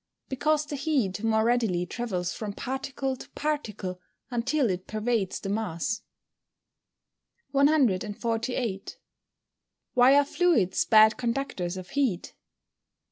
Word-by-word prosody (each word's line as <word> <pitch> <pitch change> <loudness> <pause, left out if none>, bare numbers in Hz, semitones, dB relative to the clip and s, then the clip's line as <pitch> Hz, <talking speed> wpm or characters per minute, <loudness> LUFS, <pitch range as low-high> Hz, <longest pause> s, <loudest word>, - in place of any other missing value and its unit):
_ - - -44
Because 300 +3 +1
the 295 -1 -5
heat 260 - 0
more 220 -1 +2
readily 225 -7 +1
travels 180 -5 -3
from 210 -2 -5
particle 265 +2 -3
to - - -12
particle 210 -12 -3 0.3
until 260 +3 +1
it 185 0 -5
pervades 215 -2 -1
the 195 - -5
mass. 210 +1 -2 1.5
148. 235 -5 0 1.0
_Why 255 +3 +6
are 285 - +5
fluids 285 - +2
bad 220 0 +6
conductors 235 -8 -2
of 185 0 -8
heat? 265 -11 -1
230 Hz, 110 wpm, -27 LUFS, 195-275 Hz, 1.5 s, Why